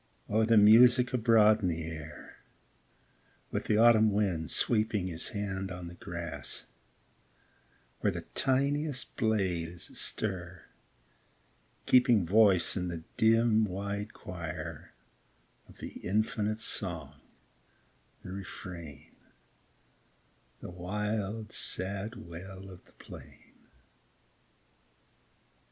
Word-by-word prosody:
O 110 +2 +2
the 115 0 +4
music 120 +4 +7
abroad 110 -3 +4
in 95 - 0
the 80 -2 -2
air, 80 -1 -9 1.1
With - - -3
the 105 - +1
autumn 110 -1 +5
wind 95 -6 -1
sweeping 110 -4 +1
His 85 -3 -3
hand 95 -2 -4
on 90 -1 -7
the 85 - -9
grass, 85 -2 -6 1.3
where - - +1
The - - -6
tiniest 140 0 0
blade 95 -7 0
is 85 0 -11
astir, 90 -4 -3 1.2
keeping 120 -6 +4
Voice 100 -1 +4
in 90 -2 -2
the 85 -2 -6
dim, 110 0 +3
wide 100 +1 -4
choir, 85 -3 -7 0.8
Of - - -17
the - - -7
infinite 110 +2 -1
song, - - 0 1.0
the 90 - -8
refrain, 90 - -9 1.5
The - - -8
wild, 105 +4 -4
sad 100 +4 0
wail 95 +3 -10
of 90 - -14
the - - -25
plain - - -14
100 Hz, 100 wpm, -30 LUFS, 90-110 Hz, 1.5 s, music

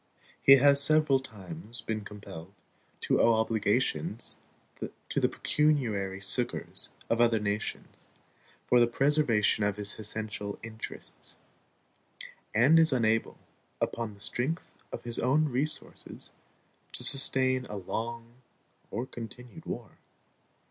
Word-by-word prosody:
He 135 - +8
has 140 +1 +6
several 150 -1 +4
times 120 - -8
been 110 -1 -4
compelled 100 -3 -10 0.5
to - - +2
owe 115 0 +5
obligations 110 +2 0 0.7
to - - 0
the - - +2
pecuniary 110 -11 0
succors 100 +6 +2 0.2
of 115 0 +1
other 115 -1 +4
nations 105 0 -4 0.6
for 125 - +4
the 120 - +5
preservation 125 -5 +2
of 105 -1 +1
his 105 0 -2
essential 105 -1 -4
interests, 110 0 -8 1.2
and 140 +9 +6
is 160 -1 +6
unable, 115 -3 +1 0.4
upon 115 -3 -3
the - - -18
strength 125 - -2 0.2
of - - -6
his 120 -1 -1
own 150 +4 +2
resources, 140 +4 -2 0.6
to - - -1
sustain 130 -2 +3
a 105 - -6
long 115 +5 -5 0.5
or 115 +4 -3
continued 125 +6 -10
war. 120 -4 -7
115 Hz, 115 wpm, -29 LUFS, 105-135 Hz, 1.2 s, He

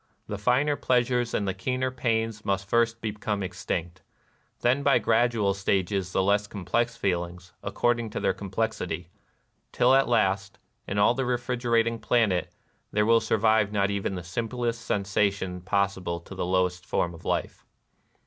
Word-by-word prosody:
The 105 - -5
finer 130 +7 +2
pleasures 125 -2 +1
and 100 - -1
the 95 - 0
keener 130 +7 -1
pains 115 -4 -1
must 100 -1 -1
first 115 +1 +1
be 110 - -2
come 105 -1 -3
extinct; 90 -1 -4 0.6
then 130 +4 +3
by 140 0 +4
gradual 115 -3 +2
stages 95 -1 0
the 95 - +1
less 100 +1 +2
complex 115 +4 -1
feelings, 90 -4 -3
according 120 -2 0
to - - -4
their - - +1
complex 100 +3 -2
ity; 90 0 -4 0.6
till 125 +2 +4
at 135 0 +4
last, 95 -4 +1 0.3
in 100 - -3
all 100 +3 +5
the 130 +2 -1
refrigerating 120 -2 0
planet, 105 -9 +1 0.4
there 105 0 +2
will 115 +1 +5
survive 110 -1 +2
not 100 -1 +1
even 100 -1 -2
the 90 - -5
simplest 115 +5 -3
sen 105 -4 -1
sation 95 -2 -1
possible 95 -2 0
to 90 - -11
the 95 -2 -3
lowest 90 -1 +1
form 85 -1 -1
of 80 - -13
life. - - -2
105 Hz, 160 wpm, -27 LUFS, 95-120 Hz, 0.6 s, all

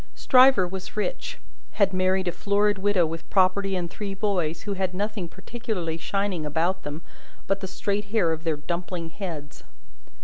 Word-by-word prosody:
Stryver 255 -7 +6
was 190 +3 -7
rich; - - -2 0.4
had 195 -2 +3
married 185 0 +2
a - - +2
florid 205 +2 +1
widow 195 -3 +3
with 165 +1 -6
property 195 +1 +3
and 175 -2 -1
three 200 +2 -5
boys, 180 -6 0
who 205 - -2
had 185 -1 -2
nothing 205 -2 -2
particularly 190 -3 -4
shining 195 0 -1
about 165 +5 0
them 145 +3 -6 0.4
but 195 0 0
the 190 - -4
straight 205 +2 -2
hair 200 -5 +2
of 160 0 -3
their 160 -3 0
dumpling 170 +1 -4
heads. 160 -7 -6
190 Hz, 165 wpm, -26 LUFS, 170-200 Hz, 0.4 s, Stryver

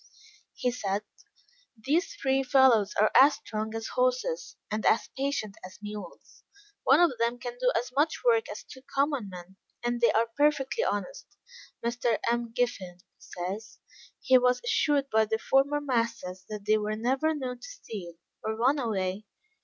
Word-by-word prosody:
He 250 - 0
said, 205 -4 -2 0.7
"These 305 - 0
three 270 - +1
fellows 260 -6 +4
are 215 - +4
as 275 +2 +7
strong 220 0 -5
as 225 0 -4
horses, - - -1 0.2
and 215 +1 -2
as 225 - +2
patient 270 -7 -2
as 185 0 -10
mules; 210 -4 -9 0.4
one 275 +4 +5
of 335 -8 +3
them 235 +1 +1
can 245 0 -6
do 250 0 +3
as 245 - -3
much 305 - +1
work 460 -2 +3
as - - -7
two 260 - -13
common 275 -4 -1
men, 180 +1 -11 0.3
and 240 0 -1
they 235 - +5
are 225 +1 +3
perfectly 295 - +2
honest. - - -3 0.6
Mr. 235 -1 +1
M'Giffin 230 -6 -2 0.2
says, 190 +5 -6 0.4
he 260 -1 +5
was 250 0 +2
assured 290 - +2
by 220 0 +4
their 220 +1 -1
former 275 +5 +2
masters 230 -9 -2
that 210 -2 -6
they 215 +1 +3
were 210 0 -2
never 265 +8 +1
known 255 -4 -4
to - - -10
steal, 205 - -8 0.3
or 220 0 -2
run 260 +6 +2
away. 200 -4 -2
240 Hz, 160 wpm, -28 LUFS, 215-275 Hz, 0.7 s, as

